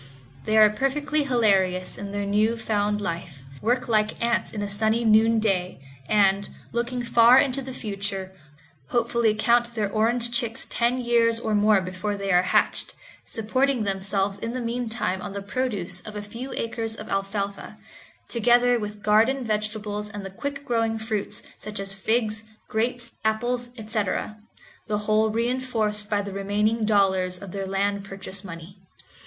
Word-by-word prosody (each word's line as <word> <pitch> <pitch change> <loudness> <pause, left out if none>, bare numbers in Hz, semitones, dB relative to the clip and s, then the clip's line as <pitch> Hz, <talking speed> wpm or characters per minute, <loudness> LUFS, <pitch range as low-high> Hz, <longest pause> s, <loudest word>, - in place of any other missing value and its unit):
They 215 - +2
are 215 -1 +8
perfectly 290 +6 0
hilarious 195 -8 +2
in 200 0 -6
their 205 0 -2
newly 215 +3 +2
found 210 -2 0
life, 165 -7 -5 0.2
work 245 +4 +1
like 215 -2 +1
ants 235 0 0
in 210 -2 -4
a - - -2
sunny 220 +3 +1
noonday, 215 -5 +3 0.3
and, 200 -1 +3 0.2
looking 240 +1 -2
far 235 +1 +6
into 270 0 +2
the 265 0 -7
future, 200 -4 -4 0.6
hopefully 235 -2 +2
count 235 +2 +2
their 210 -3 -1
orange 235 +2 +1
chicks 235 -2 -1
ten 240 +2 +1
years 235 -1 +3
or 220 -2 -2
more 210 -1 +4
before 185 +3 -3
they 200 -1 -2
are 180 0 +6
hatched; 185 - +1 0.3
supporting 255 +3 0
themselves 195 0 -1
in 230 - -4
the 255 - -2
meantime 230 -5 -2
on 190 - -6
the 200 - -4
produce 200 -7 -2
of 215 +2 -9
a 210 - -3
few 235 +6 -7
acres 225 -1 -2
of 215 - -8
alfalfa, 195 0 -3 0.5
together 240 +1 +3
with 210 -1 -6
garden 230 +6 +3
vegetables 210 -1 -3
and 205 -2 -7
the 195 - -6
quick 280 +7 -5
growing 225 -2 0
fruits, 220 -2 -3 0.2
such 210 -1 -6
as 195 0 -2
figs, 220 +2 0 0.2
grapes, 235 +1 -1
apples, 240 +3 0
etc., 215 -1 -2 0.5
the 210 -1 0
whole 215 +1 +3
reinforced 225 -3 0
by 205 -1 +1
the 200 -1 -6
remaining 210 +3 0
dollars 190 -3 +2
of 190 0 -9
their 195 0 -4
land 200 +1 0
purchase 195 0 -5
money. 175 +1 -10
215 Hz, 155 wpm, -25 LUFS, 200-235 Hz, 0.6 s, are